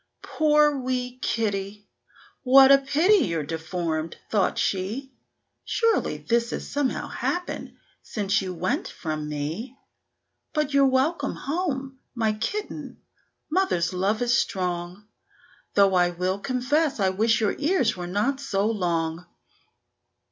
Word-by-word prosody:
"Poor 300 Hz, -2 st, +3 dB
wee 250 Hz, -1 st, -3 dB
kitty! 205 Hz, -2 st, -2 dB, 0.5 s
what 270 Hz, +1 st, +7 dB
a 275 Hz, -, +8 dB
pity 320 Hz, +8 st, +3 dB
you're 165 Hz, -3 st, -1 dB
deformed!" 165 Hz, 0 st, -3 dB
thought 205 Hz, -3 st, +1 dB
she; 220 Hz, +9 st, -2 dB, 0.5 s
"Surely 460 Hz, -1 st, +1 dB
this 235 Hz, 0 st, 0 dB
has -, -, -5 dB
somehow 285 Hz, -2 st, -1 dB
happened 355 Hz, 0 st, -3 dB, 0.3 s
since 205 Hz, -1 st, -1 dB
you 190 Hz, -1 st, -4 dB
went 180 Hz, +1 st, -2 dB
from 155 Hz, -2 st, -5 dB
me. 160 Hz, -, -4 dB, 0.8 s
But 300 Hz, -2 st, 0 dB
you're 275 Hz, -1 st, +5 dB
welcome 275 Hz, +3 st, +1 dB
home, 275 Hz, -4 st, -3 dB, 0.2 s
my 220 Hz, -2 st, +1 dB
kitten; 410 Hz, -, -5 dB, 0.5 s
mother's 320 Hz, -, +1 dB
love 200 Hz, +5 st, 0 dB
is 240 Hz, 0 st, +2 dB
strong, 180 Hz, -1 st, -2 dB, 0.7 s
Though 200 Hz, -1 st, +5 dB
I 175 Hz, -1 st, +4 dB
will 180 Hz, +2 st, -2 dB
confess 270 Hz, +5 st, 0 dB
I 190 Hz, -1 st, +3 dB
wish 220 Hz, +4 st, +2 dB
your 215 Hz, -3 st, +1 dB
ears 295 Hz, -5 st, +2 dB
were 175 Hz, -1 st, -5 dB
not 210 Hz, +9 st, 0 dB
so 200 Hz, -8 st, -1 dB
long." 175 Hz, -5 st, -1 dB
220 Hz, 125 wpm, -25 LUFS, 185-275 Hz, 0.8 s, a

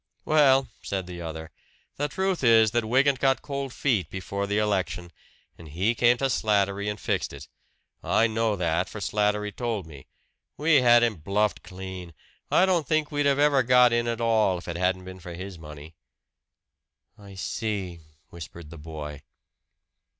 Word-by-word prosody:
"Well," 135 Hz, -4 st, +4 dB
said 95 Hz, -2 st, -3 dB
the 90 Hz, -1 st, -8 dB
other, 80 Hz, -1 st, -7 dB, 0.5 s
"the 145 Hz, -, 0 dB
truth 190 Hz, 0 st, -2 dB
is 115 Hz, -3 st, +5 dB
that 120 Hz, -1 st, 0 dB
Wygant 135 Hz, +3 st, +2 dB
got 135 Hz, 0 st, +1 dB
cold 140 Hz, -2 st, -4 dB
feet 120 Hz, -8 st, 0 dB
before 100 Hz, +1 st, -4 dB
the 105 Hz, +1 st, -1 dB
election, 95 Hz, -4 st, -1 dB, 0.5 s
and 85 Hz, -, -11 dB
he 95 Hz, +10 st, 0 dB
came 120 Hz, +1 st, +3 dB
to 135 Hz, -, -1 dB
Slattery 100 Hz, -2 st, +1 dB
and 105 Hz, 0 st, -5 dB
fixed -, -, -2 dB
it. 70 Hz, 0 st, -10 dB, 0.5 s
I 115 Hz, -, +2 dB
know 110 Hz, -1 st, 0 dB
that, 85 Hz, -1 st, -1 dB
for 105 Hz, -, -8 dB
Slattery 105 Hz, 0 st, 0 dB
told 115 Hz, -4 st, -3 dB
me. 75 Hz, -4 st, -13 dB, 0.5 s
We 155 Hz, 0 st, +4 dB
had 120 Hz, -1 st, +6 dB
him 115 Hz, -4 st, +1 dB
bluffed 100 Hz, +6 st, -1 dB
clean 90 Hz, -3 st, -9 dB, 0.3 s
I 185 Hz, -, +4 dB
don't 175 Hz, -5 st, +1 dB
think 155 Hz, -1 st, 0 dB
we'd 145 Hz, -1 st, +1 dB
ever 145 Hz, 0 st, +3 dB
have 130 Hz, -2 st, +2 dB
got 125 Hz, -1 st, +6 dB
in 120 Hz, 0 st, +1 dB
at 115 Hz, -1 st, -2 dB
all 110 Hz, -5 st, +2 dB
if 85 Hz, -, -11 dB
it 85 Hz, -, -4 dB
hadn't 90 Hz, +1 st, 0 dB
been 95 Hz, 0 st, -9 dB
for 85 Hz, -1 st, -9 dB
his 95 Hz, 0 st, -8 dB
money." 75 Hz, 0 st, -11 dB, 1.2 s
"I 100 Hz, -3 st, -13 dB
see!" 95 Hz, -3 st, -4 dB, 0.3 s
whispered 85 Hz, -1 st, -10 dB
the 85 Hz, -, -10 dB
boy. 75 Hz, -2 st, -8 dB
105 Hz, 170 wpm, -26 LUFS, 90-120 Hz, 1.2 s, had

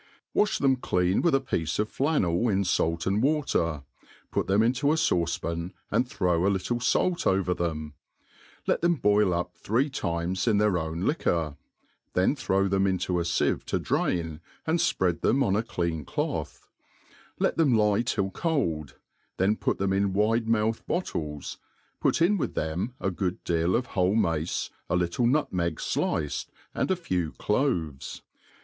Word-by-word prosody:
WASH 210 Hz, -1 st, +2 dB
them 135 Hz, -2 st, +3 dB
clean 90 Hz, -5 st, +1 dB
with 170 Hz, -5 st, +3 dB
a -, -, +4 dB
piece 85 Hz, -, -2 dB
of 105 Hz, -, +1 dB
flannel 120 Hz, -, +1 dB
in 100 Hz, -1 st, +2 dB
fait 85 Hz, -2 st, 0 dB
and 100 Hz, +3 st, +1 dB
water, 120 Hz, -, +1 dB, 0.5 s
ut -, -, +1 dB
them 100 Hz, +3 st, +3 dB
into 130 Hz, +5 st, +2 dB
a -, -, +3 dB
fauce 85 Hz, -, +1 dB
pan 85 Hz, +2 st, -4 dB, 0.2 s
and 120 Hz, +4 st, +1 dB
throw 90 Hz, -, +1 dB
a 100 Hz, -, +4 dB
little 100 Hz, +5 st, -1 dB
fait 175 Hz, +8 st, +1 dB
over 95 Hz, -2 st, +2 dB
them, 80 Hz, -4 st, -3 dB, 0.7 s
et -, -, +1 dB
them 170 Hz, 0 st, +3 dB
boil 105 Hz, -, +3 dB
up 85 Hz, 0 st, -2 dB
three 130 Hz, +7 st, 0 dB
times 85 Hz, -2 st, -2 dB
in 110 Hz, -3 st, +4 dB
their 105 Hz, 0 st, +3 dB
owii 85 Hz, -1 st, -2 dB
liquor, 85 Hz, -, 0 dB, 0.6 s
then 95 Hz, +10 st, +2 dB
throw 100 Hz, -7 st, +1 dB
them' 95 Hz, 0 st, +2 dB
into 90 Hz, -1 st, 0 dB
a -, -, 0 dB
fieve 85 Hz, 0 st, 0 dB
to -, -, 0 dB
draiii 80 Hz, -3 st, -1 dB, 0.3 s
and 160 Hz, +2 st, +1 dB
fpread 95 Hz, -, +1 dB
them 135 Hz, +3 st, +3 dB
on 100 Hz, -4 st, +1 dB
a 105 Hz, -, +2 dB
clean 85 Hz, -8 st, -2 dB
cloth; -, -, -4 dB, 0.7 s
let -, -, 0 dB
tjiem 140 Hz, -8 st, +4 dB
lie 105 Hz, 0 st, +3 dB
till 100 Hz, -5 st, -1 dB
cold, 90 Hz, -, -1 dB, 0.4 s
then 100 Hz, +3 st, +3 dB
put -, -, -1 dB
them 95 Hz, 0 st, 0 dB
in 100 Hz, 0 st, +1 dB
wide 110 Hz, +3 st, +2 dB
mouthed 115 Hz, 0 st, +1 dB
bottles, 75 Hz, -, -3 dB, 0.4 s
put 165 Hz, -, +2 dB
in 205 Hz, +4 st, +3 dB
with -, -, -2 dB
them 85 Hz, +10 st, -2 dB
a 95 Hz, -, -1 dB
good 90 Hz, -1 st, -3 dB
deal 85 Hz, +1 st, +1 dB
of 125 Hz, -, +1 dB
whole 95 Hz, +1 st, +2 dB
mace, 85 Hz, -6 st, 0 dB, 0.2 s
a -, -, +1 dB
little 90 Hz, +7 st, +1 dB
niitmeg 90 Hz, -, +1 dB, 0.2 s
diced, 75 Hz, -3 st, -1 dB, 0.2 s
and -, -, -1 dB
a 190 Hz, -, +3 dB
few 90 Hz, -, -2 dB
claves. 95 Hz, -, -1 dB
95 Hz, 170 wpm, -27 LUFS, 85-120 Hz, 0.7 s, a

